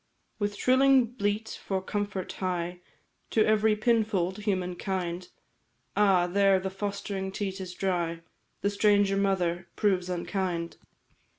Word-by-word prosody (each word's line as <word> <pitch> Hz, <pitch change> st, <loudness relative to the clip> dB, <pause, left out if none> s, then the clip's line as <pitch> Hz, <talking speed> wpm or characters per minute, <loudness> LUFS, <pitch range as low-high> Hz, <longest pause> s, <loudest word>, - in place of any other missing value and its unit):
"With 205 Hz, -1 st, -1 dB
shrilling 260 Hz, +2 st, +5 dB
bleat 220 Hz, -2 st, -3 dB
for 190 Hz, -1 st, -1 dB
comfort 205 Hz, 0 st, -3 dB
hie 180 Hz, -1 st, -3 dB, 0.5 s
To 220 Hz, -, +3 dB
every 215 Hz, 0 st, +3 dB
pinfold, 210 Hz, -4 st, +1 dB
humankind; 185 Hz, -2 st, -2 dB, 0.7 s
Ah, 195 Hz, -4 st, +4 dB
there 195 Hz, +1 st, +3 dB
the 190 Hz, 0 st, -4 dB
fostering 195 Hz, -1 st, -4 dB
teat 195 Hz, -1 st, -4 dB
is 180 Hz, -1 st, -7 dB
dry, 170 Hz, -3 st, -1 dB, 0.4 s
The 200 Hz, -, +1 dB
stranger 205 Hz, -1 st, +3 dB
mother 185 Hz, -3 st, 0 dB
proves 185 Hz, -4 st, +1 dB
unkind. 175 Hz, -1 st, -2 dB
195 Hz, 115 wpm, -28 LUFS, 180-205 Hz, 0.7 s, shrilling